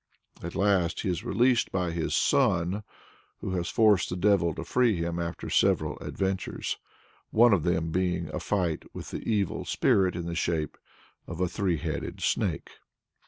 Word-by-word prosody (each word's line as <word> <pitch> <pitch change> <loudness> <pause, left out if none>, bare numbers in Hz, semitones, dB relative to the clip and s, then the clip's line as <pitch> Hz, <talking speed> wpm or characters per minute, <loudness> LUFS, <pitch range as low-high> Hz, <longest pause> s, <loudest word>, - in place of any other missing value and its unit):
At 85 - -6
last 95 -4 +2
he 100 - -2
is 90 - -2
released 125 0 +2
by 90 -2 -1
his 80 -1 -1
son, 90 +4 +2 0.6
who - - -4
has 90 -2 -2
forced 105 -4 +4
the 90 - -3
devil 95 -2 +3
to 80 - -5
free 120 +2 +2
him 85 0 -2
after 85 -1 -4
several - - +2
adventures 95 -1 -3 0.5
one 120 0 +5
of 95 - +3
them 80 0 0
being 90 -1 0
a - - -2
fight 90 -6 -1
with - - -7
the - - -4
evil 100 -6 0
spirit 95 -2 +2
in 85 -1 -4
the 85 - -3
shape 85 -2 -1 0.5
of 85 0 -7
a 90 - +2
three 90 -2 0
headed - - -4
snake. - - -1
90 Hz, 165 wpm, -28 LUFS, 85-100 Hz, 0.6 s, one